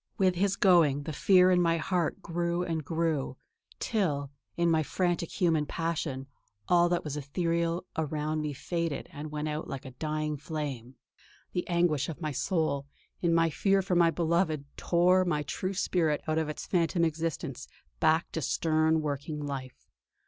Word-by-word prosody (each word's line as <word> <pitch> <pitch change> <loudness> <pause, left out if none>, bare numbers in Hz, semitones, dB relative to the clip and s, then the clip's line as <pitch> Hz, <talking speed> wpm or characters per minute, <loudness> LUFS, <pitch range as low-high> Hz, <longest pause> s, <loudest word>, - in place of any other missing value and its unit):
With 190 -2 +3
his 195 +2 +1
going, 165 -8 +4
the 155 - -5
fear 185 +2 +5
in 180 -1 +4
my 165 -1 +3
heart 175 +2 -1
grew 170 +1 -1
and 165 -3 -2
grew; 155 -4 -1 0.4
till, 145 - -1 0.3
in 170 0 +3
my 160 -1 +3
frantic 175 +1 -1
human 165 -5 +1
passion, 160 -5 -2 0.4
all 175 -1 +4
that 175 0 0
was 150 -1 -4
ethereal 170 +4 -1
around 155 0 -1
me 150 -1 -2
faded 165 +1 -3
and 150 +2 -7
went 150 0 -3
out 150 +1 -3
like 135 0 -6
a 130 - -7
dying 155 +2 -2
flame.... 140 -6 -5 0.6
The 180 - -2
anguish 170 -5 +1
of 160 - -6
my 155 -3 -2
soul, 140 -1 -1 0.3
in 170 - +2
my 165 -1 +3
fear 195 +3 +2
for 185 - -1
my 170 -1 +5
beloved, 165 -3 0
tore 180 +2 +3
my 155 -5 0
true 185 +6 -3
spirit 165 -5 +1
out 155 0 +1
of 160 -1 -1
its 150 - -5
phantom 170 -1 +2
existence 160 -4 -3 0.3
back 160 +1 +2
to 160 - -3
stern 155 +2 +2
working 145 +1 -3
life.... 135 -3 -6
160 Hz, 165 wpm, -29 LUFS, 150-175 Hz, 0.6 s, fear